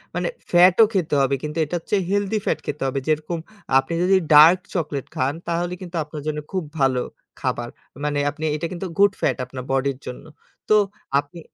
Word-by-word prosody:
মানে -, -, -1 dB, 0.2 s
ফ্যাটও 180 Hz, +5 st, +7 dB
খেতে 175 Hz, -6 st, 0 dB
হবে। 135 Hz, 0 st, +2 dB
কিন্তু 150 Hz, +2 st, -4 dB
এটার 170 Hz, +3 st, -3 dB
চেয়ে 195 Hz, -3 st, +2 dB
হেলদি 205 Hz, +1 st, +1 dB
ফ্যাট -, -, 0 dB
খেতে 145 Hz, -, -4 dB
হবে। 135 Hz, +1 st, -1 dB
যেরকম 155 Hz, +2 st, 0 dB, 0.4 s
আপনি 135 Hz, +5 st, -4 dB
যদি 190 Hz, +1 st, +4 dB, 0.2 s
ডার্ক 160 Hz, +5 st, +8 dB, 0.2 s
চকোলেট 150 Hz, -5 st, -2 dB
খান 130 Hz, +2 st, 0 dB
তাহলে 175 Hz, +1 st, -1 dB
কিন্তু 175 Hz, -1 st, -8 dB
আপনার 150 Hz, 0 st, -8 dB
জন্য 150 Hz, 0 st, -1 dB
খুব 185 Hz, -3 st, -1 dB, 0.2 s
ভালো 130 Hz, -2 st, +2 dB, 0.4 s
খাবার। -, -, -2 dB, 0.4 s
মানে 145 Hz, -1 st, 0 dB, 0.4 s
এটা 155 Hz, -, -3 dB
কিন্তু 180 Hz, +2 st, -5 dB
গুড 200 Hz, 0 st, +6 dB
ফ্যাট -, -, +1 dB
আপনার 125 Hz, 0 st, -8 dB
বডির 135 Hz, 0 st, 0 dB
জন্য। 125 Hz, -, -7 dB, 0.5 s
তো 215 Hz, -, +6 dB, 0.4 s
আপনি 145 Hz, +4 st, -8 dB
155 Hz, 175 wpm, -22 LUFS, 140-180 Hz, 0.5 s, ডার্ক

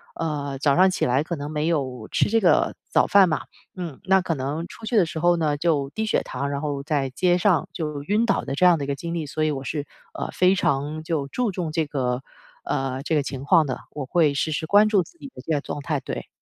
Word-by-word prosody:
呃， 145 Hz, -4 st, -3 dB
早 140 Hz, -1 st, +3 dB
上 185 Hz, +2 st, +6 dB
起 -, -, 0 dB
来 130 Hz, +4 st, +2 dB
可 170 Hz, +1 st, -4 dB
能 145 Hz, +1 st, -6 dB
没 150 Hz, +1 st, -1 dB
有 130 Hz, -8 st, -2 dB
吃 -, -, +2 dB
这 225 Hz, 0 st, +2 dB
个 170 Hz, -5 st, +3 dB
早 -, -, +3 dB
饭 195 Hz, -3 st, +6 dB
嘛， 155 Hz, -, 0 dB, 0.4 s
嗯， 170 Hz, -6 st, -6 dB
那 190 Hz, 0 st, +4 dB
可 165 Hz, -3 st, -2 dB
能 145 Hz, +6 st, -3 dB
出 225 Hz, -, -11 dB
去 230 Hz, 0 st, 0 dB
的 180 Hz, -, +5 dB
时 160 Hz, -, -7 dB
候 175 Hz, +1 st, +3 dB
呢 150 Hz, -3 st, +1 dB
就 145 Hz, -4 st, +1 dB
低 220 Hz, 0 st, -2 dB
血 215 Hz, -, +1 dB
糖， 140 Hz, 0 st, -4 dB
然 140 Hz, -, -2 dB
后 145 Hz, -2 st, -3 dB
在 140 Hz, -3 st, 0 dB
街 175 Hz, +6 st, +2 dB
上 180 Hz, -3 st, +2 dB
就 150 Hz, -3 st, -4 dB
晕 210 Hz, +7 st, +1 dB
倒 230 Hz, -, +1 dB
的 -, -, -3 dB
这 180 Hz, -, +3 dB
样 175 Hz, -2 st, +6 dB
的 -, -, -3 dB
一 -, -, -8 dB
个 140 Hz, -, 0 dB
经 170 Hz, +5 st, -5 dB
历。 165 Hz, -3 st, -2 dB
所 155 Hz, +2 st, -2 dB
以 155 Hz, -, +1 dB
我 135 Hz, -1 st, -4 dB
是， 145 Hz, +2 st, -3 dB, 0.3 s
呃， -, -, -4 dB
非 185 Hz, +1 st, +4 dB
常 150 Hz, 0 st, -1 dB
就 155 Hz, -4 st, -2 dB
注 245 Hz, -, -1 dB
重 175 Hz, -4 st, -3 dB
这 160 Hz, -2 st, +1 dB
个 125 Hz, -3 st, -1 dB, 0.4 s
呃， 135 Hz, 0 st, -2 dB
这 160 Hz, -, -2 dB
个 145 Hz, -, +3 dB
情 135 Hz, -1 st, -5 dB
况 160 Hz, +1 st, +4 dB
的， 130 Hz, -, -3 dB
我 145 Hz, -3 st, -5 dB
会 155 Hz, 0 st, +2 dB
时 155 Hz, +3 st, -1 dB
时 160 Hz, -, -2 dB
关 205 Hz, +2 st, +6 dB
注 200 Hz, -4 st, +3 dB
自 340 Hz, -, -20 dB
己 280 Hz, -, -8 dB
的 -, -, -9 dB
这 165 Hz, -, -3 dB
个 145 Hz, -, +1 dB
状 145 Hz, -, -5 dB
态， 150 Hz, -1 st, -1 dB
对。 65 Hz, -, -6 dB
155 Hz, 280 characters per minute, -24 LUFS, 140-175 Hz, 0.4 s, 上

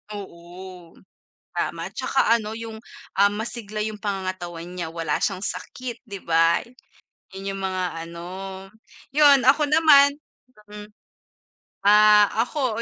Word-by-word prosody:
Oo. 180 Hz, -2 st, -11 dB, 0.6 s
Tama. -, -, -3 dB
Tsaka 230 Hz, -, +2 dB
ano 220 Hz, -2 st, -3 dB
yung, 225 Hz, -1 st, -7 dB, 0.4 s
ah, 200 Hz, +1 st, +5 dB
masigla 215 Hz, 0 st, -6 dB
yung 215 Hz, 0 st, -4 dB
pangangatawan 185 Hz, -4 st, -4 dB
niya, 175 Hz, -2 st, -6 dB
wala 165 Hz, -3 st, -2 dB
siyang 195 Hz, -2 st, -1 dB
sakit, 255 Hz, 0 st, -6 dB
'di 200 Hz, -5 st, -8 dB
ba, 165 Hz, 0 st, +4 dB, 0.8 s
yun 195 Hz, +1 st, -6 dB
yung 195 Hz, -, -6 dB
mga 180 Hz, -3 st, -3 dB
ano. 170 Hz, 0 st, -10 dB, 0.9 s
Yun, 285 Hz, -2 st, +6 dB
ako 290 Hz, +3 st, +4 dB
naman 290 Hz, -2 st, +6 dB, 0.5 s
hmm. 210 Hz, 0 st, -10 dB, 1.0 s
Ah, 210 Hz, 0 st, +7 dB, 0.2 s
ako, 245 Hz, -3 st, -2 dB
205 Hz, 115 wpm, -23 LUFS, 180-230 Hz, 1.0 s, Ah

